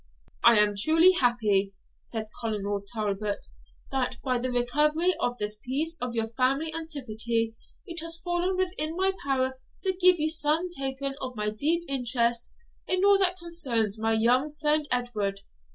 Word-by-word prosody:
"I 235 Hz, -1 st, +7 dB
am 210 Hz, 0 st, +4 dB
truly 320 Hz, -, +5 dB
happy," 215 Hz, -, +1 dB, 0.3 s
said 220 Hz, -2 st, -4 dB, 0.2 s
Colonel 205 Hz, -3 st, -2 dB
Talbot, 210 Hz, -2 st, -2 dB, 0.5 s
"that, 260 Hz, -1 st, -1 dB
by 255 Hz, -2 st, 0 dB
the 255 Hz, +1 st, -2 dB
recovery 300 Hz, +8 st, +2 dB
of 245 Hz, 0 st, -1 dB
this 210 Hz, -1 st, -2 dB
piece 310 Hz, +6 st, 0 dB
of 245 Hz, -1 st, -3 dB, 0.2 s
family 275 Hz, +6 st, +1 dB
antiquity, 235 Hz, -8 st, -2 dB, 0.3 s
it 340 Hz, -3 st, -5 dB
has 330 Hz, 0 st, -2 dB
fallen 355 Hz, +1 st, -1 dB
within 355 Hz, -4 st, -1 dB
my 380 Hz, +1 st, +2 dB
power 260 Hz, -1 st, 0 dB, 0.2 s
to 380 Hz, -1 st, +1 dB
give 365 Hz, -1 st, +6 dB
you 310 Hz, +1 st, +2 dB
some 320 Hz, +2 st, +2 dB
token 270 Hz, 0 st, -3 dB
of 255 Hz, -1 st, -5 dB
my 210 Hz, -1 st, -1 dB
deep 315 Hz, +10 st, 0 dB
interest 240 Hz, -3 st, 0 dB, 0.4 s
in 370 Hz, +1 st, +2 dB
all 400 Hz, -1 st, +6 dB
that 370 Hz, -1 st, +2 dB
concerns 255 Hz, -, -1 dB
my 225 Hz, 0 st, +1 dB
young 245 Hz, +6 st, +3 dB
friend 300 Hz, 0 st, 0 dB
Edward. 215 Hz, -6 st, -1 dB
260 Hz, 150 wpm, -27 LUFS, 225-325 Hz, 0.5 s, I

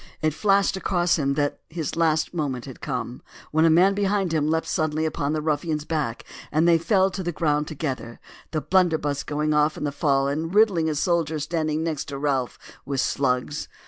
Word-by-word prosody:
It 155 Hz, -1 st, 0 dB
flashed 195 Hz, +3 st, +2 dB
across 175 Hz, -3 st, +1 dB
him 140 Hz, -1 st, 0 dB
that 145 Hz, -1 st, -1 dB
his 160 Hz, -3 st, -4 dB
last 160 Hz, -1 st, +1 dB
moment 140 Hz, -7 st, -2 dB
had 130 Hz, -3 st, -10 dB
come; 125 Hz, -3 st, -4 dB, 0.3 s
when 160 Hz, +1 st, +3 dB
a -, -, +6 dB
man 180 Hz, +5 st, +5 dB
behind 195 Hz, -3 st, 0 dB
leapt 155 Hz, +1 st, +1 dB
suddenly 155 Hz, 0 st, 0 dB
upon 150 Hz, -1 st, -1 dB
the 155 Hz, -1 st, -2 dB
ruffian's 150 Hz, 0 st, -1 dB
back 150 Hz, -9 st, -2 dB, 0.3 s
and 155 Hz, +3 st, +3 dB
they 165 Hz, -1 st, +5 dB
fell 190 Hz, +2 st, +2 dB
to 190 Hz, -, -4 dB
the 175 Hz, -1 st, -2 dB
ground 150 Hz, -2 st, 0 dB
together, 130 Hz, -7 st, -5 dB, 0.3 s
the 155 Hz, -, -2 dB
blunderbuss 160 Hz, -6 st, +1 dB
going 150 Hz, +1 st, -1 dB
off 150 Hz, +1 st, +2 dB
in -, -, -5 dB
the 145 Hz, -, -1 dB
fall 140 Hz, -1 st, +1 dB
and 160 Hz, +6 st, -2 dB
riddling 195 Hz, -7 st, +4 dB
a 155 Hz, -, -1 dB
soldier 160 Hz, 0 st, 0 dB
standing 155 Hz, 0 st, -1 dB
next 160 Hz, -4 st, -2 dB
to 140 Hz, -, -6 dB
Ralph 135 Hz, -3 st, -1 dB, 0.3 s
with 135 Hz, 0 st, -3 dB
slugs. 135 Hz, +3 st, 0 dB
155 Hz, 190 wpm, -24 LUFS, 145-170 Hz, 0.3 s, a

